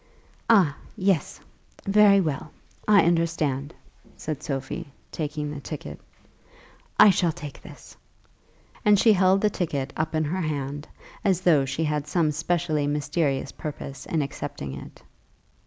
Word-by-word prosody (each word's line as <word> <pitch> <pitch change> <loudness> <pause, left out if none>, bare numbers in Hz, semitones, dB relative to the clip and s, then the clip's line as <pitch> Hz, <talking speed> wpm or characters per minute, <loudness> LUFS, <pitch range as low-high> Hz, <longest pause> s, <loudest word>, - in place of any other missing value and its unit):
"Ah, 185 -11 +5 0.2
yes; 190 -5 0 0.5
very 200 0 +6
well; 155 -4 -2 0.4
I 210 -2 +6
understand," 165 -4 0 0.4
said 150 -2 -5
Sophie, 135 +2 -4 0.2
taking 150 -1 -3
the 145 - -6
ticket. 150 +1 -7 1.0
"I 210 -1 +9
shall 180 -3 +1
take 150 -4 -9
this;" - - -13 0.9
and 210 -1 +5
she 220 +2 +5
held 190 0 +4
the 210 - +2
ticket 140 -7 -2
up 155 +1 -2
in 155 - +2
her 175 +5 -2
hand, 145 -2 -3 0.4
as 185 -3 +2
though 155 -7 +4
she 145 +4 -2
had 150 -1 -1
some 155 0 +1
specially 155 -1 0
mysterious 145 -1 -1
purpose 140 -2 -7
in 160 -3 0
accepting 70 - -6
it. - - -10
155 Hz, 135 wpm, -25 LUFS, 145-180 Hz, 1.0 s, I